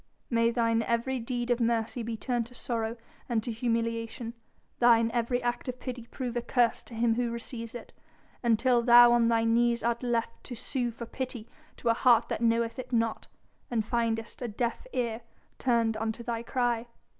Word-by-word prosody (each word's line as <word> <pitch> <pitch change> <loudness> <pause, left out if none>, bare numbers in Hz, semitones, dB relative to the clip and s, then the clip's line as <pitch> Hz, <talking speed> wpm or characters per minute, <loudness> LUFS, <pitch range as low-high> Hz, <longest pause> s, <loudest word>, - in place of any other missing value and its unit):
"May 230 0 +3
thine 230 -1 +2
every 235 +3 0
deed 240 +1 -2
of 240 - +2
mercy 230 0 0
be 230 0 -4
turned 240 0 -1
to 245 - -16
sorrow 230 -1 -2 0.3
and 225 -3 +1
to 240 - -3
humiliation, 230 0 -2 0.5
thine 230 -1 +5
every 245 +1 0
act 240 +1 -2
of 250 0 -5
pity 245 -2 -6
prove 250 -2 -5
a 240 - 0
curse 240 -1 +2
to 235 - -10
him 230 0 +2
who 240 +1 0
receives 235 0 -6
it, 240 - -9 0.5
until 240 +1 +3
thou 240 0 +8
on 235 -1 +4
thy 230 -1 +3
knees 235 +1 +2
art 235 0 0
left 235 -2 -2
to 245 - -6
sue 245 +1 -2
for 235 0 -7
pity 245 -2 -5 0.3
to 235 - -1
a - - +6
heart 235 -1 +4
that - - -2
knoweth 230 +1 +1
it 255 - -7
not, 230 -2 0 0.4
and 225 -3 0
findest 230 0 -1
a 245 - -2
deaf 235 - -3
ear 235 - -2 0.4
turned 230 -3 +2
unto 225 +1 -3
thy 235 -1 -2
cry!" 240 -1 -1
235 Hz, 185 wpm, -29 LUFS, 230-245 Hz, 0.5 s, thou